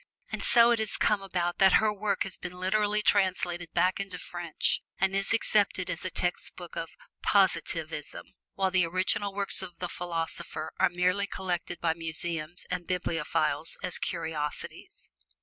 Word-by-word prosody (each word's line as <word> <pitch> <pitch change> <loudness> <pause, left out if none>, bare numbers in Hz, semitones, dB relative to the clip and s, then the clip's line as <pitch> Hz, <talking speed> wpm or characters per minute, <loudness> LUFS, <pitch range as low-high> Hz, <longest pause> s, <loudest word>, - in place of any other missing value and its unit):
And - - -3
so 235 -1 +6
it 235 - +2
has 220 - +1
come 210 -2 +2
about 175 -3 -2
that 195 -1 +6
her 215 -1 +4
work 200 -1 0
has 195 - -3
been 180 0 -7
literally 210 +3 +1
translated 180 -4 +1
back 180 +3 +3
into 195 -2 -4
French 175 -2 -2 0.2
and 195 0 +1
is 195 0 0
accepted 200 -5 +2
as 165 -2 -5
a 185 - -1
textbook 175 0 -3
of 165 -1 -4 0.3
Positivism, 165 -6 0 0.3
while 190 -1 +1
the 185 -2 +3
original 185 +3 0
books 200 0 0
of 180 -3 -7
the 180 - -3
philosopher 165 -2 -4
are - - +5
merely 180 +3 +1
collected 175 -2 -3
by 165 -1 +1
museums 165 0 -1
and 180 -1 -3
bibliophiles 165 -3 0
as 180 - -1
curiosities. 160 -3 -4
180 Hz, 155 wpm, -29 LUFS, 170-195 Hz, 0.3 s, so